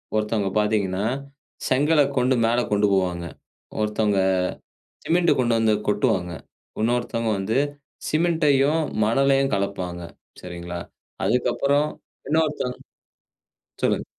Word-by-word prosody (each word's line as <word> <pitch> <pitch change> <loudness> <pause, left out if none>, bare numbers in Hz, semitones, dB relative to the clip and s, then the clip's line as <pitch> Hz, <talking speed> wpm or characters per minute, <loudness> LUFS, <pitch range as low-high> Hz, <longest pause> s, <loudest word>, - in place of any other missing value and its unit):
ஒருத்தவங்க 105 -2 0
பார்த்தீங்கன்னா 105 -2 0 0.6
செங்கல 145 +4 +4 0.2
கொண்டு 125 +1 +3
மேல 120 +2 +2
கொண்டு 105 0 +3
போவாங்க, 90 -3 0 0.6
ஒருத்தவங்க 105 -2 +1 0.8
சிமெண்ட் 170 0 +3
கொண்டு 120 -2 +2
வந்து 110 -1 +3
கொட்டுவாங்க, 95 -4 +1 0.5
இன்னொருத்தவங்க 115 -1 0
வந்து 105 +5 0 0.5
சிமெண்ட்டையும், 155 -2 +2 0.2
மணலையும் 135 +2 +2
கலப்பாங்க, 95 -3 -3 0.4
சரிங்களா. 85 -1 -6 0.5
அதுக்கப்புறம் 140 +5 +1 0.4
இன்னொருத்தங்க 150 -5 0 1.1
சொல்லுங்க. - - +1
115 Hz, 90 wpm, -23 LUFS, 100-135 Hz, 1.1 s, செங்கல